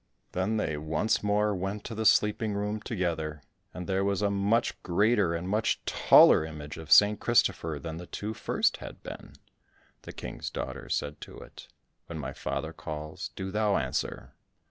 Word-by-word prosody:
Then 95 +4 0
they 80 -8 -1
once 80 +8 0
more 105 0 +2
went 95 +2 -3
to - - -6
the 110 0 +1
sleeping 105 0 +3
room 105 +1 -2
together, 80 - -3 0.3
and 90 +1 -7
there 95 +1 0
was 100 0 0
a 100 - +2
much 100 +4 +1
greater 100 -1 +2
and 85 +2 -4
much 105 +3 0
taller - - +6
image 75 -1 -7
of 80 -1 -9
St. 105 0 +7
Christopher 80 -9 +2
than 80 +3 -6
the 90 +1 -8
two 105 +2 -4
first - - 0
had - - -10
been. - - -9 0.7
The - - -9
King's - - -6
daughter 65 0 -6
said 75 +3 -2
to - - -10
it, - - -12 0.4
"When 85 - -6
my 70 -3 -5
father - - -4
calls, 75 0 -6
do 95 0 -4
thou 105 -1 +2
answer." 65 -3 -3
95 Hz, 170 wpm, -29 LUFS, 80-105 Hz, 0.7 s, St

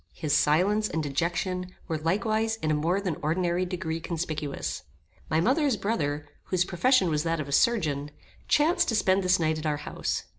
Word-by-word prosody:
His 150 -2 0
silence 200 +8 +3
and 160 - -2
dejection 180 +5 -2
were 160 -3 -2
likewise 215 +7 0
in 155 - +1
a - - +3
more 165 +6 +1
than 185 -6 -3
ordinary 175 +3 0
degree 170 -3 -3
conspicuous. 155 -4 -4 0.5
My 155 - +2
mother's 265 - +2
brother, 150 -9 -2 0.2
whose 180 -1 +1
profession 190 +1 +3
was 150 -1 +1
that 165 0 -1
of 150 - -4
a - - -7
surgeon, 150 -7 +2 0.4
chanced 330 +3 +3
to 225 - +1
spend 190 -2 +3
this 185 -1 +3
night 160 -1 +1
at 155 - -3
our 150 -1 0
house. - - -2
175 Hz, 180 wpm, -27 LUFS, 155-195 Hz, 0.5 s, silence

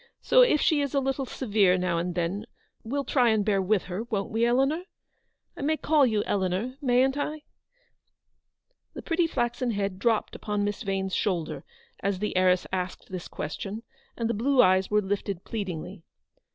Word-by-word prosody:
So, - - +6
if 480 -12 +5
she 300 -1 +3
is 280 -1 -2
a - - +4
little 270 0 -2
severe, 205 -8 +2
now 180 -2 0
and 175 0 -3
then, 185 +5 -2 0.4
we'll 275 +5 -2
try 250 -4 +3
and 215 -2 +2
bear 200 -2 +2
with 195 +1 +1
her, 185 +3 -4
won't 205 -4 -3
we, 225 +1 0
Eleanor? 270 +8 +1 0.7
I - - -8
may 310 +3 +1
call 300 -4 +3
you 215 -3 +1
Eleanor, 195 +6 -1
mayn't 260 +1 +3
I? 300 +1 -3 0.8
" - - -51
The - - -7
pretty 335 0 +1
flaxen 240 -3 -1
head 200 -3 -2
dropped 225 0 +1
upon 210 -1 -2
Miss 205 0 -2
Vane's 195 -1 -2
shoulder, 175 -6 -1 0.4
as 200 -1 -1
the 210 +1 -3
heiress 185 0 +3
asked 185 -1 -4
this 180 -2 -5
ques 150 - -5
tion, 210 +3 -5 0.3
and 230 - -1
the 235 - 0
blue 260 +5 +1
eyes 185 +1 +3
were 210 0 +3
lifted 195 -1 -3
pleadingly. 190 -3 -5
210 Hz, 180 wpm, -27 LUFS, 190-260 Hz, 0.8 s, So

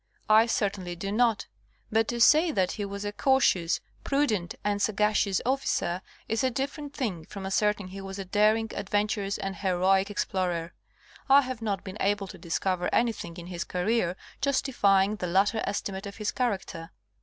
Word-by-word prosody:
I 220 +2 +7
certainly 195 -5 -1
do 195 +3 -4
not. 230 0 +2 0.5
But 225 +1 +2
to 240 - -2
say 310 +8 +6
that 190 -9 +1
he 205 - -4
was 200 +1 -5
a 205 - -2
cautious, 205 -9 +2 0.2
prudent 225 -11 0
and 205 -1 0
sagacious 210 -2 +2
officer, 245 -9 0 0.3
is 225 +2 0
a 260 - +3
different 280 +3 -4
thing 195 - -3
from 195 +1 -8
asserting 205 0 0
he 195 +1 -8
was 195 0 -7
a 195 - -5
daring, 215 +3 +2
adventurous 205 0 -1
and 195 -1 -4
heroic 190 +1 +2
ex 205 - -1
plorer. 175 -3 -2 0.6
Ihave 260 -3 +4
not 205 -4 -2
been 190 +1 -7
able 200 0 +1
to 190 - -10
discover 180 +1 -1
anything 215 -8 0
in 170 - -8
his 175 -1 -4
career 180 0 0 0.3
justifying 210 -7 +2
the 180 - -3
latter 200 +5 +2
estimate 200 0 -3
of 200 - -9
his 210 -2 -1
character. 195 -9 -3
200 Hz, 165 wpm, -28 LUFS, 190-225 Hz, 0.6 s, I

